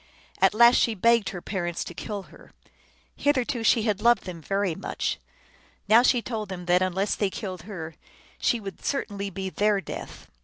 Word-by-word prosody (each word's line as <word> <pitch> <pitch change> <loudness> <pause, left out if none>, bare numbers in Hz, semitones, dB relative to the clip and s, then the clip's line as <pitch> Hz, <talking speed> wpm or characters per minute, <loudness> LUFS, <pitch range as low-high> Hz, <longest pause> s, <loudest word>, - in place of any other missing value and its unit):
At - - +4
last 235 +2 +7
she 230 -3 +2
begged 230 +1 +3
her 180 -2 -7
parents 175 -4 -3
to - - -8
kill 200 +3 -5
her. - - -17 0.6
Hitherto 255 -5 0
she 225 0 +4
had 210 -2 0
loved 235 -2 +4
them 175 -3 -7
very 195 +2 -1
much. 190 - -3 0.7
Now 225 +2 +7
she 245 -1 +3
told 215 -4 -4
them 180 -2 -6
that 180 +1 +3
un 185 -1 0
less 195 +3 0
they 205 - 0
killed 185 -3 -6
her 165 -5 -6 0.5
she 235 - +1
would 195 -4 -9
certainly 200 -8 -2
be 190 0 -5
their 210 0 +2
death. - - -8
200 Hz, 185 wpm, -26 LUFS, 185-225 Hz, 0.7 s, last